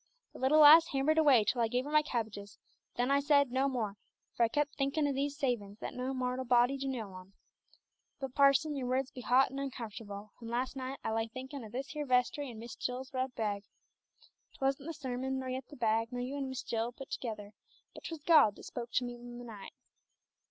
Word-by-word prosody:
The - - -11
little 285 +4 +5
lass 320 +3 +10
hammered 285 +4 +2
away 275 -8 +6
till 235 +4 0
I 230 - +3
gave 250 +3 -1
her 295 - -6
my 305 0 +6
cabbages, 215 -7 -4 0.4
then 245 +2 +1
I 280 - +4
said 285 -2 +3
'No 265 +2 +2
more,' 220 -6 -3 0.4
for - - -4
I 230 - +6
kep' 290 +4 -1
thinkin' 290 +2 +1
o' 280 - 0
these 280 +1 -2
savin's, 230 -8 -2
that - - -6
no 255 +1 -3
mortal 255 0 -2
body 245 +1 +4
do 275 0 -4
know 225 -7 -4
on. 185 +1 -12 0.9
But, 270 -2 -5
parson, 280 +2 +4
your 260 -3 -3
words 260 +1 0
be 250 - -8
hot 250 +3 +4
and 270 - -5
uncomfortable, 215 -6 -6
and 230 - -7
las' 250 +3 -2
night 265 +1 -5
I - - -1
lay 225 0 0
thinkin' 260 +3 -7
o' 220 - -9
this 260 +5 -5
here 300 -2 -4
vestry 265 +3 +1
an' 230 - -9
Miss 230 +1 -8
Jill's 255 +2 -4
red 255 -1 -2
bag. 205 -2 -2 0.9
'Twasn't 275 +2 -1
the 330 - -3
sermon, 265 0 -3
nor 260 -1 -4
yet 255 0 -4
the 295 - -11
bag, 225 0 +1
nor 245 0 -3
you 255 +3 -4
and 275 -2 -3
Miss 260 0 -5
Jill 230 +1 -2
put 270 +2 -11
together, 210 -4 -5 0.4
but - - -12
'twas 325 -3 -6
God 310 -11 +6
that - - -13
spoked 235 -1 -7
to 250 - +3
me 245 - -5
in 240 0 -9
the 245 - -8
night. 210 -4 -10
255 Hz, 225 wpm, -32 LUFS, 235-275 Hz, 0.9 s, lass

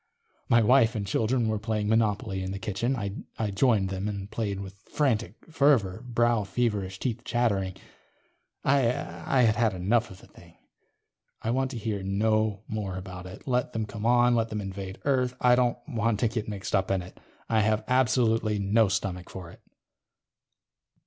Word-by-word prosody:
My 115 -1 +5
wife 120 0 +4
and 105 -2 -2
children 115 +4 +1
were 110 -1 0
playing 110 -1 -2
Monopoly 105 -2 +1
in 95 0 -4
the 100 - -4
kitchen. 115 +5 -1 0.4
I 110 -2 -1
joined 100 -2 +2
them 95 +1 -3
and 100 -1 -5
played 100 -4 -2
with 100 0 -9
frantic 115 - 0 0.2
fervor, 135 -11 +2
brow 120 -2 +1
feverish, 100 -2 -1
teeth 120 +1 -3
chattering. 100 -6 0 0.9
I 140 +1 +4
had 120 -1 +1
had 110 -3 +1
enough 110 +6 +1
of 95 - -12
the - - -15
thing. 85 -1 -18 0.9
I 115 - 0
want 130 +1 0
to 130 - -6
hear 105 -3 -3
no 105 +1 0
more 100 -4 -4
about 90 -1 -8
it. 95 +8 -12
Let 125 -1 0
them 110 -1 -1
come 105 +1 -4
on. 120 0 +5
Let 115 -1 +1
them 110 - -3
invade 95 -1 -6
Earth. 130 -3 +1
I 125 0 +5
don't 125 -1 +2
want 115 -5 0
to 120 - +4
get 110 -1 -3
mixed 100 -2 -3
up 95 -1 +1
in 95 -2 0
it. 90 - -14 0.3
I 110 - +2
have 110 0 +2
absolutely 115 -4 +2
no 105 +3 +3
stomach 95 -2 -3
for 90 -3 -8
it. - - -17
110 Hz, 175 wpm, -27 LUFS, 100-120 Hz, 0.9 s, My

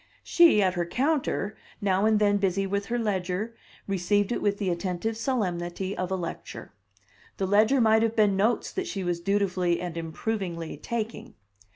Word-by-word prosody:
She, 330 -12 +5
at 185 -1 +2
her 175 -1 -1
counter, 260 - 0 0.2
now 200 0 +2
and 220 -1 +4
then 205 -1 +3
busy 195 0 0
with 200 +1 -2
her 240 - -1
ledger, 200 0 -2 0.3
received 195 +2 +1
it - - -1
with 205 -1 +1
the 195 -3 -1
attentive 180 +5 -2
solemnity 190 -6 -2
of 180 -1 -3
a 190 - 0
lecture. 175 -3 -6 0.7
The 195 - 0
ledger 215 +7 +4
might 220 -1 +4
have 225 0 +1
been 210 -3 +4
notes 215 +5 +1
that 380 -1 -3
she 195 - -4
was 175 -1 -1
dutifully 180 -2 +1
and 175 -2 -5
improvingly 170 0 -4
taking. 230 -1 -5
200 Hz, 170 wpm, -27 LUFS, 180-220 Hz, 0.7 s, She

